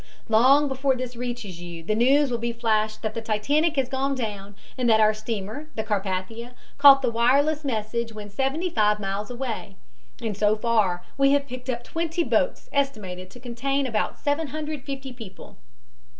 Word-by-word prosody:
Long 260 +6 +5
before 265 0 +1
this 250 -1 -5
reaches 235 -7 -5
you 170 -1 -8
the 215 - 0
news 265 +5 +4
will 240 - -1
be 235 +1 -1
flashed 220 -2 0
that 220 -1 -2
the 230 - -4
Titanic 285 +10 +1
has 270 -3 +1
gone 270 +1 -1
down 205 -5 -5 0.2
and 250 -2 +1
that 220 -1 +5
our 215 0 +5
steamer, 215 +6 -5
the 220 - -2
Carpathia, 205 +3 -3 0.3
caught 275 -1 +8
the 245 - +1
wireless 280 +7 +2
message 230 -2 -2
when 210 -1 -8
seventy 270 - -1
five 210 -3 +2
miles 200 +1 -3
away, 240 -5 -5 0.4
and 225 -4 -3
so 210 +1 +3
far 215 -6 +1 0.2
we 275 0 +5
have 285 0 +2
picked 255 -1 -8
up 240 -1 -2
twenty 330 +4 -2
boats - - 0
estimated 205 -10 -2
to 245 - -13
contain 265 +3 -1
about 225 -4 -1
750 285 -2 -3
people. 225 -6 -11
235 Hz, 170 wpm, -25 LUFS, 215-275 Hz, 0.4 s, caught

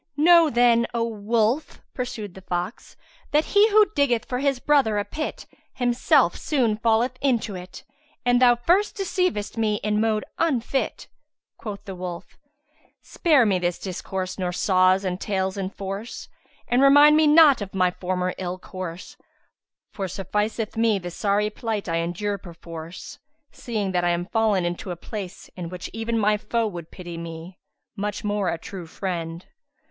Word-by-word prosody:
"Know, 335 +1 +6
then, 235 -1 +4
O 230 - +1
wolf!" 225 +5 0
(pursued 245 -6 -5
the 190 - -12
fox), 180 +3 -5 0.3
"that 300 +1 +2
he 410 +2 +6
who 425 0 +6
diggeth 245 -6 +2
for 250 - -3
his 275 -1 +1
brother 260 -5 +2
a 205 - 0
pit 305 0 -5 0.3
himself 245 -1 +3
soon 240 -8 0
falleth 230 +3 +1
into 240 -6 +1
it, 180 0 -9 0.4
and 245 0 +3
thou 245 -1 +6
first 355 - +1
deceivedst 365 - -1
me 215 -2 +1
in 210 0 +1
mode 220 -1 0
unfit." 270 -4 -1 0.5
Quoth 205 -3 -7
the 195 - -6
wolf, 180 -2 -7 0.6
"Spare 300 -8 +3
me 195 -4 +2
this 175 -1 -1
discourse 185 0 -5
nor 180 -1 -1
saws 185 +1 +3
and 185 0 -3
tales 190 -2 -1
enforce, 195 +2 -6 0.4
and 245 +2 +2
remind 290 +2 +7
me 310 0 +5
not 295 -5 +7
of 195 -1 -6
my 185 -1 +3
former 180 0 -2
ill 185 -1 -3
course, 185 -2 -8 0.7
for 195 -2 -4
sufficeth 210 +4 -2
me 225 -2 +2
the 175 -2 -6
sorry 205 +3 0
plight 220 -3 -3
I 165 -1 0
endure 180 +5 -2
perforce, 165 -1 -9 0.3
seeing 215 -5 -3
that 180 -1 0
I 175 - +2
am 175 0 0
fallen 210 -3 +1
into 175 +2 -4
a 175 - -3
place, 190 +1 -8
in 175 -2 -6
which 180 -1 -7
even 225 +1 -2
my 210 -1 +3
foe 230 +2 -1
would 175 -6 -6
pity 175 -2 -8
me, 165 +2 -8 0.4
much 210 +1 -3
more 205 -2 0
a - - -2
true 175 +1 -8
friend. 170 -1 -5
210 Hz, 160 wpm, -24 LUFS, 185-240 Hz, 0.7 s, remind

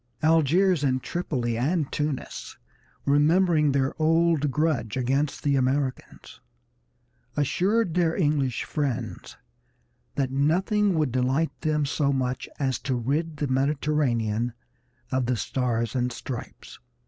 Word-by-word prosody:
Algiers 165 +2 +3
and 130 -2 +1
Tripoli 125 -9 -2
and 150 +3 0
Tunis, 150 -3 -4 0.5
remembering 150 +1 +3
their 135 +1 +1
old 165 -2 +3
grudge 135 -7 0
against 135 +3 0
the 140 -1 +2
Americans, 130 0 -2 1.0
assured 185 - +1
their 170 -2 +2
English 145 - +1
friends 140 -6 -4 0.8
that 135 -2 0
nothing 185 - +2
would 155 -5 +1
delight 130 +6 +1
them 150 -1 +1
so 140 0 +1
much 130 -2 -2
as 135 -3 -1
to 135 -2 -2
rid 150 +6 -1
the 145 - -1
Mediterranean 130 -5 0 0.6
of 130 -2 0
the 125 -1 +1
Stars 115 -1 -1
and 125 -1 0
Stripes. 120 0 -8
140 Hz, 115 wpm, -26 LUFS, 130-160 Hz, 1.0 s, Algiers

